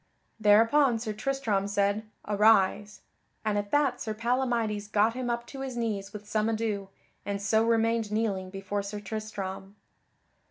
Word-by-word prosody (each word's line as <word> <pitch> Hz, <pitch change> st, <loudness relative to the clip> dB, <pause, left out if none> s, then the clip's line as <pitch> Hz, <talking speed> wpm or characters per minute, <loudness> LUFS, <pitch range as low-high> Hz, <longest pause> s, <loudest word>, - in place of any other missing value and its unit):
Thereupon 230 Hz, +5 st, +5 dB
Sir 220 Hz, -1 st, -4 dB
Tristram 220 Hz, -4 st, -1 dB
said, 200 Hz, +1 st, +1 dB, 0.3 s
"Arise," 210 Hz, 0 st, +3 dB, 0.4 s
and 215 Hz, -1 st, +1 dB
at 205 Hz, 0 st, -2 dB
that 280 Hz, -2 st, +1 dB
Sir 215 Hz, -2 st, -3 dB
Palamydes 230 Hz, -3 st, 0 dB
got 215 Hz, +2 st, +3 dB
him 250 Hz, 0 st, -3 dB
up 235 Hz, 0 st, -2 dB
to 270 Hz, +3 st, -9 dB
his 260 Hz, -2 st, -5 dB
knees 205 Hz, -4 st, -2 dB
with 210 Hz, 0 st, -9 dB
some 215 Hz, +1 st, 0 dB
ado, 215 Hz, -3 st, -2 dB, 0.3 s
and 200 Hz, 0 st, -3 dB
so 220 Hz, +2 st, +2 dB
remained 230 Hz, -1 st, +1 dB
kneeling 205 Hz, -4 st, -1 dB
before 195 Hz, +1 st, -3 dB
Sir 200 Hz, +1 st, -5 dB
Tristram. 200 Hz, -2 st, -6 dB
215 Hz, 150 wpm, -28 LUFS, 205-230 Hz, 0.4 s, Thereupon